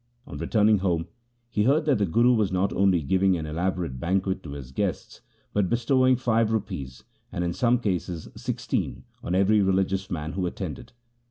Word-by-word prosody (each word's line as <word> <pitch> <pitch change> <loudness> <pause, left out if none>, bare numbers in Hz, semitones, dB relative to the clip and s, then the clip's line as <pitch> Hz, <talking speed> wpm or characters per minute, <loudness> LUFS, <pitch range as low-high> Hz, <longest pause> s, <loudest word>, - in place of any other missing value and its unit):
On - - -9
returning 105 -1 +3
home 85 -3 -1 0.4
he 105 -2 +1
heard 145 +4 +3
that 140 -7 +2
the 100 - +2
Guru 120 +8 +4
was 105 -5 +1
not 95 +2 0
only 95 -4 +3
giving 95 +4 +2
an 80 - -4
elaborate 85 -3 -2
banquet 95 +4 0
to 70 - -8
his 70 -3 -8
guests, 65 - -3 0.3
but 100 -3 +1
bestowing 130 +2 +3
five 115 -3 +1
rupees, 70 - -4 0.3
and 90 - -2
in 85 0 -1
some 120 +4 +2
cases 90 -6 -3
sixteen - - -3 0.2
on 90 - -2
every 100 +3 +4
religious 95 0 +1
man 80 -3 -3
who 90 0 -1
attended. 85 - -6
95 Hz, 175 wpm, -26 LUFS, 85-110 Hz, 0.4 s, Guru